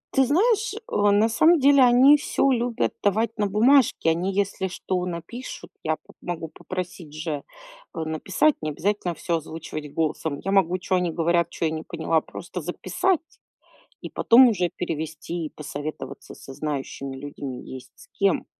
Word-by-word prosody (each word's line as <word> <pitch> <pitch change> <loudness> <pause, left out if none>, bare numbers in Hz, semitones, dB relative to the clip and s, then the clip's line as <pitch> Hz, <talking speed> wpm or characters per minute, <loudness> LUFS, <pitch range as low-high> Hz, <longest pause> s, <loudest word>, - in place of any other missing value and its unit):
Ты 270 - +5
знаешь, 425 - +2
э, 445 0 -8
на 205 +2 +4
самом 315 +8 +4
деле, 280 0 +6
они 255 +4 +7
всё 275 -1 +1
любят 240 -1 0
давать 220 +3 +1
на 205 - +2
бумажке. 220 -3 +4
Они, 180 +4 -1
если 195 -1 -1
что, 180 0 -3
напишут, 180 +9 -7
я 155 0 +1
поп - - -21
могу 165 -2 -5
попросить 180 -4 -7
же, 155 -2 -4 0.5
э, - - -4
написать, 160 - +1
не 155 - -2
обязательно 180 +2 -1
всё 170 -2 -1
озвучивать 155 -1 -7
голосом, 155 -1 -1
я 195 - -1
могу- 185 -2 +3
чё 185 +1 -1
они 180 -2 0
говорят, 170 +1 +1
чё 165 - -3
я 160 - +1
не 160 0 -3
поняла- 160 -1 0
просто - - -7
записать, 350 -3 -2 0.6
и - - -6
потом 245 +2 +6
уже 180 -5 0
перевести 160 0 -4
и - - -5
посоветоваться 145 -2 -7
со 135 - -11
знающими 140 -2 -4
людьми, 140 -2 -7
есть 130 -1 -10
с - - -17
кем. - - +1
180 Hz, 165 wpm, -24 LUFS, 155-235 Hz, 0.6 s, они